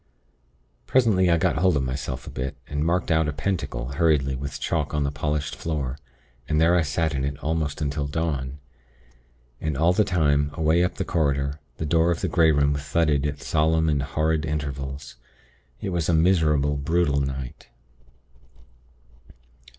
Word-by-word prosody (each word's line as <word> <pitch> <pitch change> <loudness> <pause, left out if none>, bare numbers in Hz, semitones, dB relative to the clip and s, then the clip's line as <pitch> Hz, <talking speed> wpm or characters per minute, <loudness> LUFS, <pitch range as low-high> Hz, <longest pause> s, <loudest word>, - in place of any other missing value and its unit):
"Presently 105 -8 +3
I 85 - +4
got 80 - +1
hold 90 -1 +3
of 70 - 0
myself 65 -1 -4
a - - -8
bit, 65 +1 -4
and 75 +1 -2
marked 85 +2 0
out 80 -1 +3
a - - 0
pentacle 75 -7 -3
hurriedly 70 -3 +2
with 70 +2 -5
chalk 75 -2 -1
on 75 - +1
the 70 - -1
polished 75 0 -2
floor; 70 -4 -3 0.5
and 75 -1 +2
there 85 +2 +4
I 90 - +4
sat 80 +1 -1
in 65 -1 -1
it 70 +1 -2
almost 80 -1 -1
until 70 0 -2
dawn. 70 -3 -2 1.0
And 80 -3 -2
all 85 +4 +4
the 105 - +3
time, 75 -7 +2
away 80 +1 +3
up 90 - -1
the - - -3
corridor, 70 -2 0 0.2
the 80 - -3
door 80 +2 +3
of 85 - 0
the - - 0
Grey 80 -2 +4
Room 70 -1 +2
thudded 75 0 +1
at 70 -1 -5
solemn 80 0 +2
and 75 -2 +1
horrid 80 +2 0
intervals. 70 -4 -4 0.6
It 100 - -3
was 85 -3 -1
a 85 - +4
miserable, 75 -4 +3
brutal 75 0 +1
night. 65 -2 -5
75 Hz, 165 wpm, -24 LUFS, 70-80 Hz, 1.0 s, I